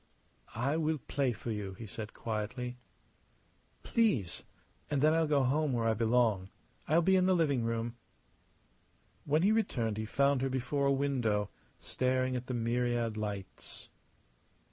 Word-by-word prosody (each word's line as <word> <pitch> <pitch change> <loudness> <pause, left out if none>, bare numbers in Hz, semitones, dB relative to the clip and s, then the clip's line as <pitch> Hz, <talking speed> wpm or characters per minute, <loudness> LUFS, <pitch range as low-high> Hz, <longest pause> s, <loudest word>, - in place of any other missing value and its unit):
"I 135 +7 0
will 160 -1 +1
play 135 -1 -1
for 115 +1 -5
you," 100 -3 -4
he 115 - -8
said, 110 +1 -7
quietly. 125 +3 -4 1.0
"Please! 195 - +1 0.5
And 145 - +1
then 155 +3 +4
I'll 165 -1 +2
go 145 -2 +3
home 145 +2 +1
where 115 -1 +1
I 110 - +3
belong. 110 -4 +2 0.4
I'll 165 +3 +4
be 190 +3 +4
in 185 0 +4
the 185 - +4
living 145 -8 +2
room." 115 +1 -2 1.3
When 155 +3 +2
he 200 - +5
returned 120 - 0
he 110 - -2
found 140 +2 +2
her 135 - 0
before 130 +2 0
a - - +4
window, 125 -7 0 0.3
staring 130 0 0
at 125 0 -4
the 125 - -2
myriad 120 -1 0
lights. 105 -3 -6
125 Hz, 150 wpm, -32 LUFS, 115-140 Hz, 1.3 s, he